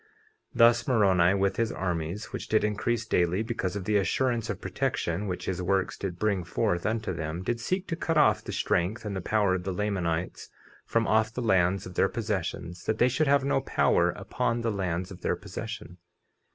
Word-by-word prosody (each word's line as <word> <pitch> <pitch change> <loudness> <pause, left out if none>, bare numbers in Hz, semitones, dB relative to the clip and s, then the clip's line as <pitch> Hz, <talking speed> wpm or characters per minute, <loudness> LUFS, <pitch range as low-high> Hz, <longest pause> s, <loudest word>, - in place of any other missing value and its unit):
50:12 440 - -32 0.5
Thus 115 0 +5
Moroni, 95 -7 +4
with 100 0 +1
his 115 -1 +1
armies, 90 +1 -3
which - - -5
did 110 - +2
increase 110 +2 0
daily 90 0 +1
because 110 -5 -3
of 100 - -3
the 105 +1 +2
assurance 115 +5 0
of - - -3
protection 85 +5 -2
which 90 -1 -4
his 90 -1 -2
works 95 +1 0
did 90 -3 -5
bring 100 -3 0
forth 85 +1 -1
unto 110 -3 -1
them, 80 +2 -4
did 120 +4 -1
seek 185 +11 -2
to 165 - -1
cut 165 -1 -1
off 150 - +4
the - - -6
strength 105 +7 0
and 100 -2 -3
the 95 - -3
power 105 -1 +2
of 90 -1 -2
the 95 - -2
Lamanites 90 -3 -2 0.4
from 115 0 +1
off 110 0 +2
the 125 - -5
lands 95 -3 +2
of 90 - -8
their 95 - +2
possessions, 90 -5 -3
that 110 - 0
they 125 - +4
should 155 +4 +1
have 140 -1 +4
no 140 - +1
power - - +2
upon 115 0 -2
the 115 -1 0
lands 90 -2 -2
of 95 - -10
their - - 0
possession. 105 -2 -7
100 Hz, 205 wpm, -28 LUFS, 90-115 Hz, 0.5 s, Thus